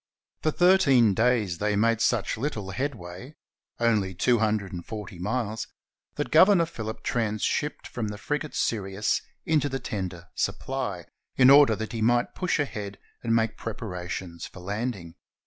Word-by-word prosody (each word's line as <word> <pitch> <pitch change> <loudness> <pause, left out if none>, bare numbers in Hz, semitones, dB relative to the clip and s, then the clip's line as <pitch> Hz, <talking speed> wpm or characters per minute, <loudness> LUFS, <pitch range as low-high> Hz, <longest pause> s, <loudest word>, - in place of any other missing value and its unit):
For 155 - +2
thirteen 150 - +5
days 110 -5 +1
they 105 0 +1
made 115 +2 +2
such 115 -4 +1
little 110 -6 -3
headway 120 - -5 0.2
— - - -46
only 105 -6 +1
two 120 +5 +3
hundred 105 -3 0
and 85 -1 -5
forty 105 -4 -7
miles 110 +2 -2 0.2
— - - -54
that 145 - -3
Governor 175 +2 +6
Phillip 110 -9 -6
transshipped 115 +6 -1
from 115 -3 -4
the 105 0 -5
frigate 150 +6 -3
Sirius 100 -1 0 0.2
into 150 -2 +2
the 135 - -2
tender 90 -6 -5
Supply, 125 - -3 0.3
in 130 0 +7
order 140 -5 +7
that 110 +1 -5
he 115 -2 -4
might 120 +2 +2
push 180 -2 0
ahead 105 -7 -3 0.2
and 115 -1 +1
make 110 -1 +1
preparations 90 -6 -5
for - - -13
landing. 100 -3 -4
110 Hz, 155 wpm, -26 LUFS, 100-130 Hz, 0.3 s, in